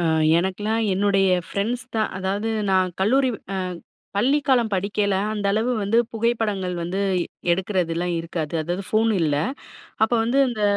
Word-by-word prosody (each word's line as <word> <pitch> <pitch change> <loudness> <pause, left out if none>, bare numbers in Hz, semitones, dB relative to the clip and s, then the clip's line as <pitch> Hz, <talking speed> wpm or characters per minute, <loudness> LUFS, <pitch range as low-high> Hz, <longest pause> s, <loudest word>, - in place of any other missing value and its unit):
ஆ, - - 0 0.4
எனக்கெல்லாம் 210 +5 -1
என்னுடைய 195 0 +2 0.2
ஃப்ரெண்ட்ஸ் 235 +6 -2
தான். 215 - +1
அதாவது 200 +4 -2 0.2
நான் 185 -1 +2
கல்லூரி 260 +7 +3 0.3
அ - - -1 0.6
பள்ளிக்காலம் 260 -1 +2
படிக்கையில 200 +1 0 0.2
அந்த 205 -2 -2
அளவு 225 +4 +1
வந்து 205 +4 +2
புகைப்படங்கள் 215 -5 -1
வந்து 175 +4 -2 0.5
எடுக்கிறதெல்லாம் 180 -2 -1
இருக்காது. 165 -2 -4
அதாவது 175 +4 -3
ஃபோன் 225 +1 +2
இல்ல. 150 -3 +1 0.7
அப்போ 220 +2 +3
வந்து 250 +4 +1
அந்த 220 -3 -3
200 Hz, 135 wpm, -23 LUFS, 185-225 Hz, 0.7 s, கல்லூரி